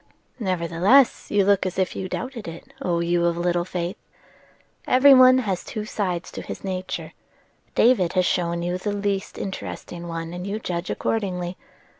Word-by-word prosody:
"Nevertheless 185 +6 +3
you 205 -2 +3
look 200 -1 +3
as 185 -1 -3
if 190 -1 0
you 185 - -4
doubted 245 -2 -5
it, 170 +11 -10
O 170 -8 0
you 170 0 +1
of 170 0 +1
little 175 0 +1
faith. 180 0 -4 0.9
Every 270 +2 +7
one 255 0 +8
has 200 -8 -1
two 215 -1 -5
sides 185 -6 -3
to - - -6
his - - -8
nature: 185 -1 -4 0.6
David 220 -8 +4
has 185 -1 +2
shown 170 -1 0
you 175 +1 -2
the 205 +2 -2
least 200 -1 -2
interesting 175 -2 -6
one, 165 0 -5
and 180 +2 -5
you 200 +2 -2
judge 180 -4 -4
accordingly. 180 -5 -2
185 Hz, 165 wpm, -24 LUFS, 175-205 Hz, 0.9 s, one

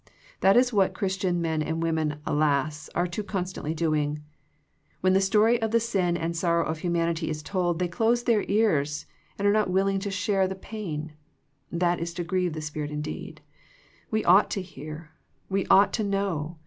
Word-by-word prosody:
That 195 +4 +5
is 250 0 +4
what 195 -3 +2
Christian 185 -3 -1
men 160 -1 0
and 160 +2 -2
women, 155 -2 -1
alas, 150 0 0
are 175 - +2
too 180 +4 -3
constantly 185 -6 -3
doing. 150 -2 0 0.8
When 185 0 +3
the 190 - +4
story 215 +4 +3
of 225 - 0
the 230 +2 +3
sin 190 -7 0
and 165 0 -2
sorrow 170 0 +1
of 160 0 -3
humanity 170 -1 0
is 150 -1 -4
told, 175 -1 0
they 180 +1 0
close 230 +7 +1
their 230 -4 +2
ears 150 -9 +1 0.3
and 200 - +1
are 205 - +4
not 215 -2 +2
willing 195 +1 +2
to 200 +1 -3
share 195 +1 0
in 190 - +2
the 190 - -4
pain. 165 -7 -6 0.6
That 175 0 +1
is 170 0 -4
to 175 - -2
grieve 180 -1 -1
the 155 - -5
Spirit 155 -1 -4
indeed. 150 0 -6 0.7
We 220 0 -1
ought 185 +4 +6
to 195 - -2
hear. 155 -1 -9 0.4
We 195 0 0
ought 200 +1 +5
to 220 - 0
know. 190 -6 -2
175 Hz, 185 wpm, -26 LUFS, 160-195 Hz, 0.8 s, ought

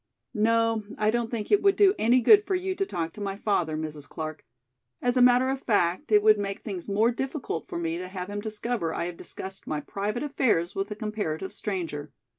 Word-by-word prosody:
"No, 225 +1 +2 0.2
I 215 0 +2
don't 235 0 -1
think 225 -3 -4
it 415 - +5
would 395 -1 +4
do 395 -2 +5
any 245 +3 +4
good 415 - +7
for 385 - +1
you 375 +1 -1
to 390 +1 -2
talk 165 -3 -3
to 210 - -9
my 195 -1 -2
father, 175 -7 0
Mrs. 155 -2 -6
Clark. 155 -1 -6 0.6
As 245 0 +1
a 250 - +4
matter 250 +1 +5
of 270 0 -3
fact, 185 -4 +1
it 210 -1 +6
would 215 -1 +6
make 200 -1 -3
things 195 -4 -6
more 215 +4 +3
difficult 265 - -4
for - - -5
me 165 0 -2
to 185 - -5
have 185 -1 -6
him 205 0 -4
discover 215 -5 -2
I 170 - -1
have 175 0 -5
discussed 190 +3 -8
my 150 - -1
private 205 - -3
affairs 225 - +1
with 195 +2 -2
a 210 - -4
comparative 205 -5 -3
stranger. 165 -8 -4
210 Hz, 220 wpm, -27 LUFS, 175-240 Hz, 0.6 s, good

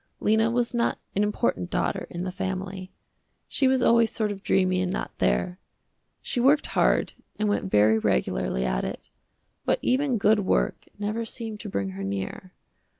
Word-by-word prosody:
Lena 220 +1 +3
was 240 0 0
not 235 -1 +1 0.2
an 200 - +2
important 210 -3 0
daughter - - -1
in 175 +1 -5
the 185 - -3
family. 190 0 -4 0.6
She 270 - +2
was 260 -1 +3
always 230 -2 +5
sort 215 -2 -1
of 195 -1 -7
dreamy 185 -1 +2
and 180 0 -1
not 200 - -4
there. 180 +1 +1 0.6
She 255 - -1
worked 275 +5 +4
hard - - +2 0.2
and 215 - 0
went 205 -1 0
very 110 - +4
regularly 65 -5 0
at - - 0
it, - - -6 0.5
but - - +2
even 260 -1 +2
good 210 +1 +4
work 195 - 0
never 210 +3 -2
seemed 225 -1 -5
to 210 - -6
bring 100 - -2
her 95 +1 -6
near. 100 - -4
205 Hz, 170 wpm, -26 LUFS, 180-230 Hz, 0.6 s, always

